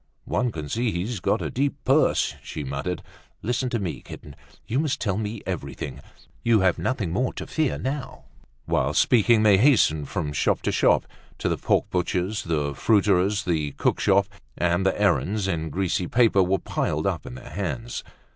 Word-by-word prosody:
"One 125 -1 0
can 75 -6 -6
see 115 - 0
he's 105 +4 -3
got - - 0
a - - -3
deep 140 +2 0
purse," 140 +4 +3
she 75 - -6
muttered. 70 +7 -4 0.4
"Listen 120 +3 0
to 120 - -1
me, 90 -9 -4
kitten; 75 -2 -11 0.3
you 125 +5 -1
must 145 -2 0
tell 100 -5 0
me 105 0 -4
everything. 70 -7 -5 0.4
You 115 -3 +3
have 95 -2 +2
nothing 115 -10 -1
more 125 +9 0
to - - -6
fear 155 -4 0
now." 135 0 -4 0.4
Whilst - - +1
speaking 115 -1 +4
they 100 -3 +6
hastened 100 - +3
from 80 -7 -3
shop - - +1
to - - +1
shop—to - - 0
the - - +1
pork - - +1
butcher's, 95 +4 -1
the 75 -4 -1
fruiterer's, 100 0 +2
the 75 -6 -1
cook - - 0
shop; 100 0 +4 0.3
and 90 +2 +1
the 95 - 0
errands 105 0 +1
in 80 -4 -2
greasy 90 +2 -1
paper 115 -3 +4
were 95 +1 +2
piled - - -2
up - - -2
in - - -7
their 65 - -10
hands. 115 +5 -4
95 Hz, 175 wpm, -25 LUFS, 85-115 Hz, 0.4 s, they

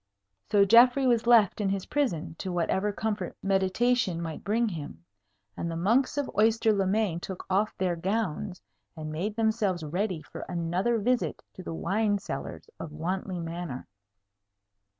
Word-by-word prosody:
So 200 -1 +5
Geoffrey 245 +5 +6
was 235 -2 +2
left 220 -4 +5
in 200 - +1
his 195 -1 -2
prison 195 - -1
to 190 - -3
whatever 190 +4 0
comfort 205 -3 -3
meditation 195 +1 +1
might 165 -2 -5
bring 225 +3 +1
him; 145 - -8 0.5
and 170 - -3
the 165 - -4
monks 230 +12 +2
of 285 - 0
Oyster 220 +1 +3
le 195 -2 +1
Main 195 -4 +1
took 185 +1 -7
off 205 +3 +1
their 180 -2 0
gowns, 190 0 -2 0.4
and 155 -1 -5
made 190 +7 -3
themselves 220 -6 0
ready 175 +2 -2
for - - -9
another 180 +7 0
visit 240 +3 0
to - - -9
the 165 - -5
wine 205 +4 +1
cellars 200 - -6
of 165 - -6
Wantley 180 +4 -3
Manor. 165 -5 -5
195 Hz, 155 wpm, -28 LUFS, 175-220 Hz, 0.5 s, Geoffrey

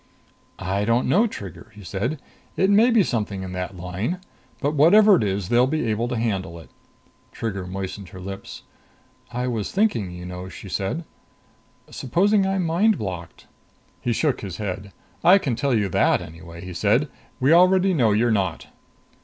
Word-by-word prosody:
"I 95 +2 -1
don't 115 +3 +2
know, 210 - +4
Trigger," 100 - -9
he 105 - -12
said. 110 - -3 0.4
"It 190 +1 +3
may 220 +4 +6
be 230 -4 +4
something 105 - -2
in 95 - -6
that 90 +1 -5
line. 95 - -3 0.4
But 145 +2 0
whatever 195 +8 +6
it - - +1
is, 95 -2 -2
they'll 120 +1 +4
be 155 -1 -1
able 115 +3 -1
to 125 -1 -2
handle 95 -7 -2
it." 80 - -14 0.6
Trigger 100 -5 -4
moistened 95 0 -6
her 95 - -11
lips, 95 +1 -8 0.7
"I 125 +1 -2
was 115 -5 -2
thinking, 190 - +1
you 90 0 -8
know," 90 +1 -7
she 95 - -10
said. 100 - -2 0.9
"Supposing 195 - +2
I'm 190 -2 0
mind 185 +6 +3
blocked." 90 -5 -6 0.6
He 120 - -1
shook 140 +3 0
his 95 -4 -6
head. 100 -1 -5 0.3
"I 185 +3 +8
can 135 -11 -1
tell 135 +1 +1
you 105 -3 +1
that, - - +3
anyway," 85 +2 -10
he 90 - -7
said. 110 - +2 0.3
"We 135 +4 +4
already 185 +2 +5
know 120 -9 +3
you're 115 +3 +2
not." 95 -6 -1
110 Hz, 170 wpm, -23 LUFS, 95-155 Hz, 0.9 s, I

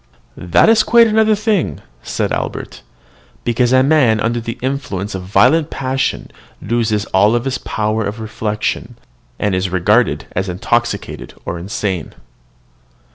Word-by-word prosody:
"That 90 - +3
is 225 0 +6
quite 235 0 +5
another 220 -1 +3
thing," 210 -3 0 0.2
said - - -2
Albert; - - -4 0.6
"because 120 +1 +1
a 130 0 +5
man 135 -7 +3
under 115 +2 0
the 115 0 -5
influence 125 -7 -3
of 95 - -4
violent 105 - +3
passion 130 0 -2 0.3
loses 110 -3 0
all 105 +5 +4
power 110 -4 -2
of 105 +3 -5
reflection, 110 -1 -3 0.4
and 105 -2 0
is 95 +1 0
regarded 105 +6 +2
as 95 +1 -2
intoxicated 105 +3 -2
or 85 - -4
insane." 95 -2 -4
115 Hz, 130 wpm, -17 LUFS, 100-130 Hz, 0.6 s, is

